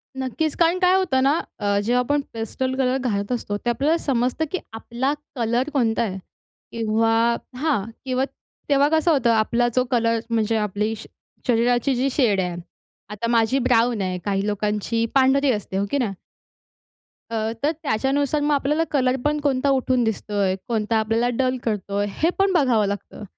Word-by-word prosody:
नक्कीच. 265 +4 -2
कारण 340 +2 +3
काय 365 0 +4
होतं 300 -9 +2
ना 285 +4 +3 0.2
अ, 200 0 +1
जेव्हा 245 +3 +2
आपण 290 +4 +1
पेस्टल 245 +4 -3
कलर 260 0 +1
घालत 210 -4 -2
असतो, 205 -4 -2
ते 240 - -3
आपल्याला 280 +8 +1
समजतं, 255 +3 0
की 375 - 0 0.2
आपला 240 +5 -2 0.2
कलर 240 +3 0
कोणता 235 -4 +1
आहे 195 -3 -3 0.5
किंवा 225 +1 +2 0.2
हां, 270 -8 0 0.2
किंवा 260 0 0 0.4
तेव्हा 285 0 +4
कसं 320 +2 +3
होतं, 260 -5 +2
आपला 235 +2 +2
जो 255 - +4
कलर 230 -1 +2
म्हणजे 225 -1 +1
आपली 210 +1 -1
श - - -10 0.4
शरीराची 245 +2 +2
जी 260 +3 +1
शेड 225 -9 +2
आहे, 180 -1 -3 0.5
आता 210 +2 -4
माझी 230 +3 +3
ब्राउन 235 -2 +2
आहे. 185 -1 -2
काही 200 -1 0
लोकांची 210 +2 -1
पांढरी 270 +1 +4
असते, 205 -4 -3
हो 200 - +1
की 285 - +1
नाही? 230 -7 -1 1.2
अ, - - -2 0.3
तर 295 - +3
त्याच्यानुसार 280 +3 0
मग 295 0 +2
आपल्याला 295 +3 +1
कलर 255 -3 +2
पण 300 0 +1
कोणता 275 -1 +1
उठून 260 -2 +2
दिसतोय? 205 -3 -1
कोणता 220 -1 0
आपल्याला 225 +2 +1
डल 255 -1 +1
करतोय? 205 -2 -1 0.2
हे 330 - +4
पण 390 0 +3
बघावं 250 - +3
लागतं. 205 +1 -6
240 Hz, 165 wpm, -22 LUFS, 220-275 Hz, 1.2 s, काय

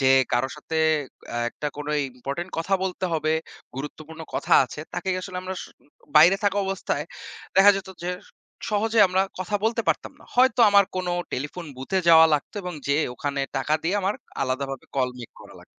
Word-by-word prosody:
যে 130 -1 +4 0.2
কারো 120 +2 +2
সাথে 160 - -5 0.6
আ - - -2
একটা 150 - -5
কোনো 150 0 -4 0.2
ইম্পোর্টেন্ট 140 +8 -5
কথা 175 +4 +1
বলতে 190 0 -3
হবে, 155 -1 +1 0.4
গুরুত্বপূর্ণ 155 +3 -8
কথা - - -1
আছে 150 - -8
তাকে 180 +2 -4
আসলে 185 -1 -7
আমরা 185 0 -4
স - - -8 0.5
বাইরে 170 +6 +8
থাকা 200 0 +2
অবস্থায় 195 0 -2 0.5
দেখা 195 +1 +9
যেত 195 - -6
যে 175 - -2 0.6
সহজে 220 +2 +1
আমরা 185 +1 +2 0.2
কথা 185 +3 -1
বলতে 225 +1 +1
পারতাম - - 0
না। - - -16
হয়তো 250 -1 +4
আমার 200 0 +6
কোনো 180 -1 -1 0.2
টেলিফোন 150 +7 -4
বুথে 135 +9 -1
যাওয়া 160 -1 +9
লাগতো 145 - -3
এবং 180 -1 -5
যেয়ে 140 +2 +2
ওখানে 140 +1 -3 0.2
টাকা 135 +3 +1
দিয়ে 175 +4 0
আমার 195 +2 0 0.3
আলাদাভাবে 135 0 -3
call 130 -2 +1
make 120 - -10
করা - - -14
লাগতো। - - -16
165 Hz, 180 wpm, -25 LUFS, 140-190 Hz, 0.6 s, দেখা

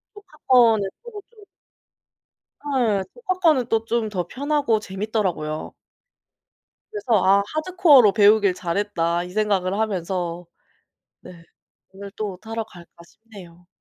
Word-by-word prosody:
조카 385 -7 -17
거는 225 -6 +4
크고 455 -4 -9
좀 455 -3 -21 1.4
예 215 -6 +1
조카 375 -7 -4
거는 305 -9 +3
또 225 -1 0
좀 230 -2 -1
더 180 -4 -4
편하고 285 -3 0
재밌더라고요. 190 -7 -4 1.2
그래서 245 - 0
'아 195 +1 +4
하드코어로 310 - +4
배우길 205 -2 +4
잘했다.' 175 -2 -2
이 180 - -9
생각을 200 -1 -1
하면서 180 -4 -3 0.8
네. 170 -2 -14 0.5
오늘 200 +1 -10
또 200 -4 -5
타러 225 0 -5
갈까 175 -5 -16
싶네요. 180 -4 -16
210 Hz, 250 characters per minute, -22 LUFS, 185-245 Hz, 1.4 s, 거는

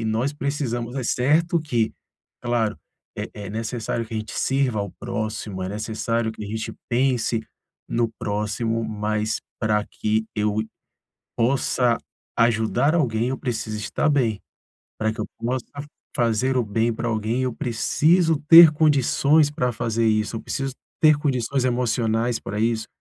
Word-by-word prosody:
e - - -3
nós 110 +6 0
precisamos. 135 -5 -3
É 135 - -2
certo 160 +8 +2
que, 120 -7 0 0.5
claro, 120 -3 0 0.4
é - - -3
é 105 -2 -7
necessário 115 +1 -3
que 110 - -8
a - - 0
gente 110 0 -6
sirva 135 -4 +1
ao 100 -1 -4
próximo, 110 -4 -4
é 95 - -3
necessário 110 +2 -2
que 110 - -8
a - - -7
gente 110 +1 -4 0.2
pense 120 -2 +1 0.5
no 115 -1 +1
próximo, 110 +2 -1
mas 110 0 -1 0.2
pra 105 -2 +1
que 110 +1 -1
eu 105 0 0
i 110 - -12 0.7
possa 120 -1 +2 0.4
ajudar 115 +5 +2
alguém, 120 -7 +1
eu 130 - -2
preciso 115 -4 -3
estar 105 +8 0
bem. 120 -8 +1 0.6
Para 110 0 0
que 110 - -7
eu 105 - -2
possa 125 +1 -2 0.5
fazer 120 +2 +1
o 125 - +2
bem 115 +3 0
para 115 +1 -3
alguém, 115 +3 -1
eu 125 - -1
preciso 155 +7 +2
ter 165 -1 +11
condições 150 0 +3
para 125 -5 -1
fazer 115 0 0
isso, 110 +1 +1
eu - - -6
preciso 135 0 -3 0.3
ter 155 -1 +6
condições 135 -2 0
emocionais 120 -2 +1
pra 105 +1 -5
isso, 115 0 0
115 Hz, 155 wpm, -23 LUFS, 110-130 Hz, 0.7 s, ter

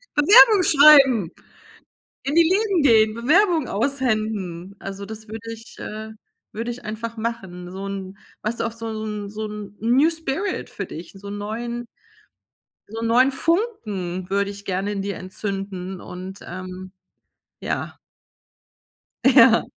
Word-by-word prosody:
Bewerbungen 400 +5 +7
schreiben! 275 - +7 1.0
In 275 - -1
die 335 - +7
Läden 390 -3 +2
gehen! 220 -4 +5
Bewerbung 315 - +3
aushändigen! 215 -7 -2
Also, 195 +1 -7
das 220 +1 -9
würde 225 +1 -7
ich 225 0 -12
äh, 215 +1 -7 0.4
würde 230 +2 -4
ich 240 +1 -8
einfach 225 +2 -5
machen, 195 -6 -5
so 195 +1 -6
'n 195 -1 -6 0.3
weißt 225 +2 -3
du, - - +1
auch 230 - -4
so 230 0 -7 0.2
'n 210 -1 -5
so 215 +1 -5
'n 210 -1 -8
New 255 +8 +4
Spirit 330 +4 -3
für 200 - -5
dich, 165 +1 -9
so 200 +1 -10
'n 205 0 -5
neuen 235 +3 -4 1.0
so 225 +2 -7
'n 230 - -1
neuen 250 +4 +4
Funken 215 - -2
würde 200 +1 0
ich 200 0 -11
gerne 195 +2 -2
in 200 - -3
dir 200 -1 -3
entzünden 190 -1 -5
und, 185 +2 -8
ähm 185 +1 -8 0.7
ja. - - -4 1.3
Ja. 250 -3 +6
220 Hz, 140 wpm, -22 LUFS, 195-255 Hz, 1.3 s, Bewerbungen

